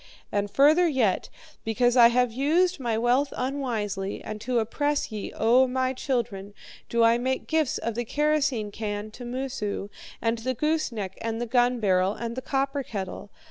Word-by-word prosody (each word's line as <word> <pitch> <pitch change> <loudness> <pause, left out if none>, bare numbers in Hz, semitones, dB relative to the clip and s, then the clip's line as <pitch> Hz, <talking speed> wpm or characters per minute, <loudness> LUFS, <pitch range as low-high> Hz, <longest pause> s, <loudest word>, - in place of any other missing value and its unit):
"'And 205 0 -1
further 305 - +5
yet, 250 - +1 0.3
because 245 +2 +2
I 240 -2 +9
have 245 0 +2
used 330 +7 +2
my 235 -4 -1
wealth 245 +5 +2
unwisely, 225 -8 -3
and 215 0 -6
to 250 +1 -1
oppress 290 +6 0
ye, 210 -2 -5
O 250 +3 +4
my 260 0 0
children, 210 -7 -3 0.3
do 235 0 +2
I 230 +1 +5
make 260 +1 -1
gifts 315 -4 +1
of 230 - -3
the 240 +2 -2
kerosene 290 -5 0
can 210 0 -4
to 245 +3 -9
Moosu, 240 -5 -4 0.3
and 230 0 0
the 255 +3 -2
gooseneck, 235 - -2
and 225 0 -2
the 240 - -1
gun 245 +1 +2
barrel, 190 -2 +2
and 235 0 -5
the 260 - -4
copper 275 +1 -1
kettle. 200 -5 -6
240 Hz, 170 wpm, -26 LUFS, 215-270 Hz, 0.3 s, I